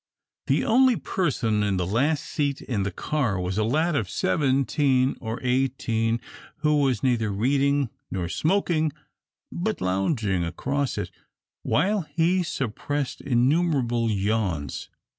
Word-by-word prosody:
The - - +2
only 255 +1 +5
person 130 - 0
in 100 -2 +1
the 90 - 0
last 140 - +1
seat 140 -3 -1
in 115 -6 -2
the 100 - 0
car 120 - -1
was 90 +3 -2
a - - +2
lad 155 +9 +1
of 105 -9 -1
seventeen 135 - +1
or 110 0 -4
eighteen 125 -3 0 0.4
who 150 -1 +3
was 130 -6 +1
neither 120 -4 +2
reading 140 +5 +1 0.2
nor 90 -3 -2
smoking, 160 - +1 0.6
but - - -2
lounging 95 - 0
across 135 - -2
it, - - -3 0.5
while 195 +6 +1
he 175 +3 +1
suppressed 140 -1 -3
innumerable 125 -3 +2
yawns. 100 -8 -1
130 Hz, 125 wpm, -25 LUFS, 105-150 Hz, 0.6 s, only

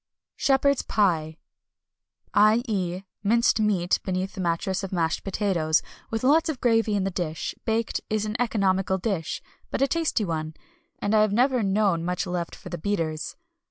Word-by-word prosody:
Shepherd's 280 0 +3
Pie, 165 -7 +1 1.0
i.e. 210 -4 +2 0.2
minced 230 +2 +3
meat 195 -5 +2
beneath 185 0 -2
a - - -7
mattress 180 +2 -1
of 195 - -5
mashed 165 -3 0
potatoes, 185 -6 +1 0.3
with 225 +1 -3
lots 315 +5 +4
of 290 -5 -3
gravy 225 -3 +2
in 200 - +1
the 195 - -1
dish, 165 -3 -3
baked, 225 +1 0
is 215 -1 0
an 215 0 -3
economical 195 -5 +1
dish, 190 -5 -3 0.3
but - - -2
a - - +4
tasty 320 -9 0
one; 155 -2 -3 0.4
and 205 - -1
I 215 - +5
have 215 -1 +2
never 250 +2 +3
known 195 -4 +2
much 180 +2 -1
left 180 -2 -3
for - - -11
the 175 -1 -5
beaters. 165 -5 -2
195 Hz, 160 wpm, -25 LUFS, 175-225 Hz, 1.0 s, I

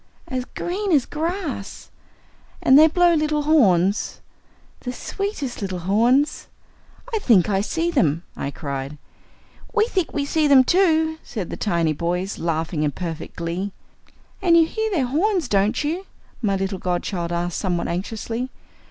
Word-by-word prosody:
"As 255 -1 -3
green 385 +7 -3
as 285 -6 +4
grass." 315 - -4 0.7
"And 260 - +5
they 310 +3 +9
blow 350 +2 +4
little 305 -1 +1
horns?" 205 - +3 0.6
"The 250 - -5
sweetest 305 - -4
little 190 -2 -3
horns!" 235 - +2 0.7
"I 445 - +1
think 215 - +4
I 195 0 +2
see 330 +10 -1
them," 170 - +1
I 140 - -3
cried. 140 0 -5 0.8
"We 430 - +4
think 375 -8 -1
we 285 -1 -1
see 305 +1 +2
them 275 -2 +7
too," 320 -1 +2
said 205 -7 -6
the - - -3
tiny 170 -6 0
boys, 180 +5 -2
laughing 160 -1 -1
in 150 -2 0
perfect 165 -3 -6
glee. 175 +4 -3 0.7
"And 340 -3 +5
you 330 - +6
hear 440 +6 -2
their 325 -11 +1
horns, 340 - +1
don't 210 +5 +1
you?" 340 +6 -3 0.3
my 200 -4 +1
little 195 0 -2
godchild 175 -1 -2
asked 175 0 -2
somewhat 180 -3 -1
anxiously. 225 +7 -3
240 Hz, 150 wpm, -22 LUFS, -, 0.8 s, they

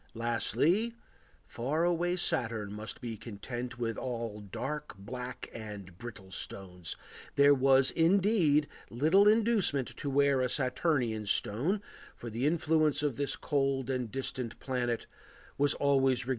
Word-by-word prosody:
Lastly, 125 - +1 0.5
far 140 +8 -1
away 175 +1 +1
Saturn 115 - -1
must 105 +1 -6
be 115 -2 -5
content 120 +3 -6
with 115 -2 -2
all 115 -4 -4
dark, 130 +5 -5
black, 125 +5 -6
and 105 -5 -8
brittle 105 -5 -9
stones; 90 -3 -6 0.4
there 140 0 +7
was, 135 0 +4
indeed, 170 -4 +3 0.2
little 160 - +4
inducement 210 - +3
to 145 - -3
wear 140 -1 +3
a 125 - +1
Saturnian 125 -5 0
stone, 150 - +1 0.3
for 120 - -8
the 120 +6 0
influence 155 -2 +2
of 145 -5 0
this 140 -2 +1
cold 135 -2 0
and 125 -3 -2
distant 130 -3 -3
planet 125 -3 -2 0.5
was 145 0 +2
always 140 0 +2
regarded 135 -1 +4
as 125 - 0
baleful. - - -7
130 Hz, 140 wpm, -31 LUFS, 115-150 Hz, 0.5 s, there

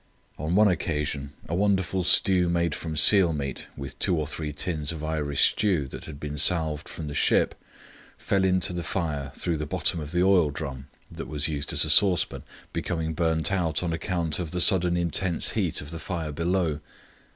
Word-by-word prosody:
On 80 +4 -1
one 105 +1 +6
occasion 75 -5 -2
a - - -4
wonderful 95 -1 +1
stew 90 -1 +4
made 85 -2 +1
from 80 0 -5
seal 90 +1 +5
meat, 70 -3 -4
with 70 -1 -7
two 90 -4 +1
or 75 - -1
three 75 0 -5
tins 75 0 -2
of 80 -2 -6
Irish 75 -3 +2
stew 90 -10 0
that - - -8
had 75 -3 -9
been 75 -1 -5
salved 80 -2 0
from 80 - -7
the 75 - -5
ship, - - +2 0.6
fell 95 -1 0
into 95 -1 +2
the 90 - -3
fire 75 -7 -3
through 85 -2 -1
the 75 0 -4
bottom 85 - -1
of 75 -1 -6
the 90 +1 +2
oil 95 -5 +4
drum 70 -3 -6 0.2
that - - -7
we 75 - -6
used 75 -1 -1
as - - +2
a - - -3
saucepan 95 -5 +3 0.3
becoming 80 -1 -2
burnt 80 +1 0
out 85 -4 0
on 85 -2 -1
account 85 -1 -2
of 85 -3 -3
the 90 - -3
sudden 90 -2 +5
intense 85 0 0
heat - - -1
of 75 - -9
the 85 - -6
fire 80 -2 -4
below. 85 -1 0
80 Hz, 195 wpm, -26 LUFS, 75-90 Hz, 0.6 s, one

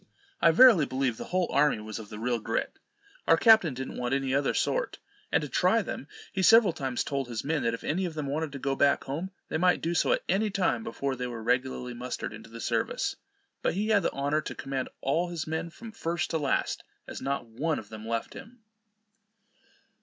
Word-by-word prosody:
I 165 - +7
verily 185 - +7
believe 130 -2 -1
the - - -6
whole 185 -1 0
army 145 -3 +3
was 110 0 -6
of 105 -2 -10
the 105 - -8
real 120 +2 -1
grit. 115 +1 -3 0.5
Our - - +6
captain 220 - +6
didn't 130 +1 -5
want 125 +2 0
any 135 -1 -1
other 140 0 +1
sort; - - 0 0.3
and - - +2
to - - -3
try 185 +9 +2
them 145 - -6 0.3
he 190 - 0
several 220 -2 +6
times 130 -5 -2
told 140 -2 -2
his 120 -2 -4
men, 150 0 0
that 115 -1 0
if - - -12
any 180 +5 0
of 170 -3 -5
them 150 -2 -3
wanted 150 +2 -2
to - - -4
go 135 0 -1
back 140 +1 +3
home, 160 +8 -4 0.2
they 160 - -1
might 180 +1 +4
do 170 - -1
so 165 - +2
at - - +1
any 205 +4 +2
time, 195 +3 0
before 140 -12 -3
they 125 0 -3
were 115 -2 -6
regularly 125 +1 0
mustered 120 -2 -5
into 110 +1 -11
the 115 +1 -9
service. - - -1 0.5
But - - 0
he 210 +3 -1
had 210 -2 +4
the - - 0
honour 145 +2 0
to - - -6
command 135 -1 -3
all 165 +6 +1
his 170 -3 -4
men 160 +1 -3
from 225 +7 -10
first 175 -5 -2
to 160 - 0
last, 140 -3 0 0.2
as - - -7
not 135 -2 -2
one 140 +8 -2
of 105 - -8
them 110 0 -8
left 115 0 -2
him. 230 0 -12
140 Hz, 220 wpm, -28 LUFS, 125-175 Hz, 0.5 s, I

